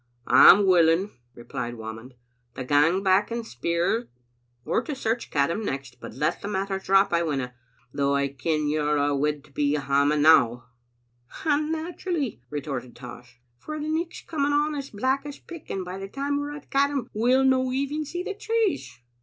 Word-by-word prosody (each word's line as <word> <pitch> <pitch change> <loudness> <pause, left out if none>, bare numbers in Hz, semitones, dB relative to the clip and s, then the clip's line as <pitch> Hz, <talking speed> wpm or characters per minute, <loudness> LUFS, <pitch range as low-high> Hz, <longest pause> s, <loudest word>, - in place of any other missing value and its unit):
" - - -38
I'm 200 +2 +8
willing," 180 +1 +4 0.2
replied 120 0 -6
Whamond, 110 +3 -9 0.4
"to 130 - -4
gang 150 +8 +3
back 190 +2 +3
and 235 0 -4
speir, 170 - -1 0.6
or - - +1
to 280 +4 -5
search 230 -2 -2
Caddam 165 +9 0
next; 135 -7 -5
but - - -9
let 150 +4 -1
the - - -5
matter 195 -1 -2
drop 195 0 +3
I 170 - +3
winna, 135 -6 -2 0.4
though 140 0 +1
I 140 0 +1
ken 150 +3 -1
you're 150 0 +1
a' 145 0 +2
awid 145 0 -1
to - - -21
be 145 +1 0
hame 145 +1 +1
now." 125 -6 +4 0.8
"And 305 0 +1
naturally," 320 - -3
retorted 135 -4 -5
Tosh, 125 -1 -12 0.2
"for 305 0 -6
the 300 - -4
nichfs 325 +2 -3
coming 290 -3 0
on 300 +1 +1
as 280 -2 -5
black 260 +6 -1
as 290 -1 -8
pick, 335 -3 -12
and 190 -1 -3
by 185 +2 -6
the 195 - -6
time 280 +6 -2
we're 290 0 -4
at 290 - -13
Caddam 275 -2 +1
we'll 250 +5 +3
no 260 -1 +2
even 280 +4 -2
see 350 +4 -5
the 410 - -4
trees." 425 - -2
190 Hz, 180 wpm, -25 LUFS, -, 0.8 s, I'm